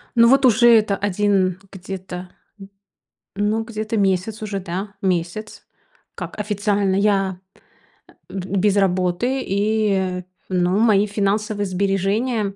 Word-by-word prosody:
Ну 235 Hz, 0 st, +6 dB
вот 270 Hz, +1 st, +5 dB
уже 240 Hz, 0 st, +5 dB
это 215 Hz, -3 st, +4 dB
1 195 Hz, -2 st, +1 dB
где-то. 185 Hz, -1 st, -7 dB, 1.1 s
Ну, 210 Hz, +2 st, 0 dB
где-то 220 Hz, 0 st, -4 dB
месяц 195 Hz, +3 st, 0 dB
уже, 200 Hz, -2 st, -3 dB
да, 190 Hz, +3 st, -5 dB
месяц, 185 Hz, +3 st, -3 dB, 0.5 s
как -, -, -7 dB
официально 205 Hz, -1 st, 0 dB
я 195 Hz, -2 st, +1 dB
п -, -, -26 dB, 0.7 s
э, -, -, -13 dB
б 195 Hz, +1 st, -3 dB
без 205 Hz, +1 st, +2 dB
работы, 190 Hz, +7 st, +1 dB
и 195 Hz, -3 st, 0 dB, 0.3 s
ну 180 Hz, +2 st, +1 dB
мои 210 Hz, -3 st, +4 dB
финансовые 205 Hz, 0 st, -1 dB
сбережения, 200 Hz, +3 st, -1 dB
200 Hz, 120 wpm, -21 LUFS, 190-215 Hz, 1.1 s, Ну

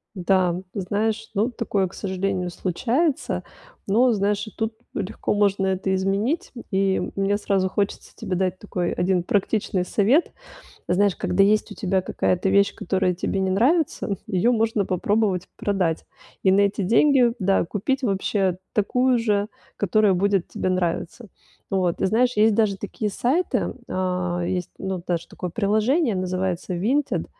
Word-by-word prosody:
Да, 180 Hz, -1 st, +2 dB, 0.2 s
знаешь, 215 Hz, +3 st, -2 dB
ну, 220 Hz, +5 st, +1 dB
такое, 205 Hz, -5 st, -1 dB
к 175 Hz, -, -15 dB
сожалению, 190 Hz, -2 st, -2 dB
случается. 255 Hz, -, -1 dB, 0.4 s
Но 240 Hz, +5 st, +4 dB
знаешь, 205 Hz, 0 st, 0 dB
и 215 Hz, -, -9 dB
тут 220 Hz, 0 st, -2 dB, 0.2 s
легко 205 Hz, +1 st, -2 dB
можно 200 Hz, -2 st, +2 dB
это 190 Hz, 0 st, 0 dB
изменить, 205 Hz, -, -1 dB
м, 235 Hz, -, -8 dB
и 195 Hz, 0 st, +1 dB
мне 200 Hz, +1 st, +1 dB
сразу 195 Hz, -2 st, 0 dB
хочется 200 Hz, +1 st, -3 dB
тебе 185 Hz, -, -3 dB
дать 185 Hz, 0 st, 0 dB
такой 180 Hz, -4 st, -2 dB
1 180 Hz, -1 st, +1 dB
практичный 195 Hz, -1 st, 0 dB
совет. 225 Hz, -, +2 dB, 0.6 s
Знаешь, 190 Hz, +2 st, +2 dB
когда 195 Hz, +2 st, +2 dB
есть 210 Hz, +2 st, +2 dB
у -, -, -7 dB
тебя 190 Hz, -2 st, 0 dB
какая-то 185 Hz, +1 st, 0 dB
вещь, 200 Hz, +1 st, +3 dB
которая 185 Hz, 0 st, 0 dB
тебе 195 Hz, -, -2 dB
не 190 Hz, 0 st, 0 dB
нравится, 245 Hz, -, +1 dB
её 210 Hz, +4 st, +2 dB
можно 225 Hz, -3 st, +1 dB
попробовать 190 Hz, 0 st, 0 dB
продать, 185 Hz, -5 st, -1 dB, 0.4 s
и 190 Hz, -, +5 dB
на 200 Hz, +1 st, +4 dB
эти 200 Hz, 0 st, +1 dB
деньги, 240 Hz, +3 st, +4 dB
да, 195 Hz, -2 st, +2 dB
купить 260 Hz, +9 st, -2 dB
вообще 195 Hz, -3 st, 0 dB, 0.2 s
такую 250 Hz, +4 st, +2 dB
же, 210 Hz, -3 st, +1 dB, 0.3 s
которая 205 Hz, +1 st, +3 dB
будет 195 Hz, 0 st, +1 dB
тебе -, -, -2 dB
нравиться. 185 Hz, +5 st, -2 dB, 0.4 s
Вот, 185 Hz, -3 st, +1 dB
ты -, -, 0 dB
знаешь, 245 Hz, +5 st, +2 dB
есть 215 Hz, +1 st, +5 dB
даже 205 Hz, -2 st, +2 dB
такие 210 Hz, +1 st, -4 dB
сайты, 270 Hz, -, 0 dB
а, 180 Hz, -1 st, -1 dB
есть, 180 Hz, -1 st, -2 dB
ну, 190 Hz, -2 st, -4 dB
даже 170 Hz, -2 st, -2 dB
такое 180 Hz, -, -6 dB
приложение, 220 Hz, -, +1 dB
называется 185 Hz, 0 st, -2 dB
Vinted, 260 Hz, +11 st, 0 dB
195 Hz, 150 wpm, -23 LUFS, 185-220 Hz, 0.6 s, и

